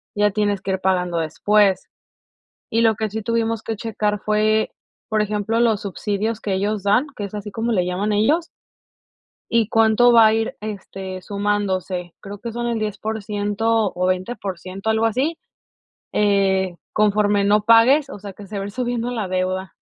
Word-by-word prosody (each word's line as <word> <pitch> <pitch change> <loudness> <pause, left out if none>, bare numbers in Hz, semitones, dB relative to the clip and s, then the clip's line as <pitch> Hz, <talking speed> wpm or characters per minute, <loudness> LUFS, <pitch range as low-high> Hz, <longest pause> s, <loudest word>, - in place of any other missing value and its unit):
ya 210 0 +3
tienes 205 -1 0
que 195 - -2
ir 190 - -1
pagando 180 -2 0
después. 200 +5 +2 0.8
Y 230 - +2
lo 225 -2 +3
que 220 +1 -1
sí 220 +2 -4
tuvimos 230 0 -1
que 225 - -4
checar 210 -2 -2
fue, 215 +1 +1 0.4
por 215 -1 +1
ejemplo, 210 +2 -1
los 225 -4 +3
subsidios 205 +3 -2
que 200 - -3
ellos 205 +2 -1
dan, 205 +8 +3
que 205 - -4
es 200 - -7
así 210 0 -5
como 230 +3 -1
le 180 -4 +1
llaman 190 +4 -1
ellos, 290 +12 +2 1.0
y 230 -2 +2
cuánto 225 +2 +4
va 230 -2 +8
a 215 - +4
ir, 225 0 -1
este, 195 -3 -6
sumándose. 190 -3 -2
Creo 205 0 -8
que 230 +3 -6
son 240 +1 -2
el 235 -1 -1
10%, 210 0 -1
o 180 +1 +1
20% 185 +1 -3
algo 220 +1 +2
así, 270 +9 0 0.8
eh, 195 -3 +2 0.2
conforme 210 -1 +2
no 205 +1 +4
pagues. 245 +6 +5
O - - -8
sea, 200 0 -8
que 205 +1 -11
se 205 +2 -7
va - - -3
a - - -4
ir - - -9
subiendo 245 0 -2
la 220 -6 -3
deuda. 185 +1 -2
210 Hz, 175 wpm, -21 LUFS, 195-225 Hz, 1.0 s, va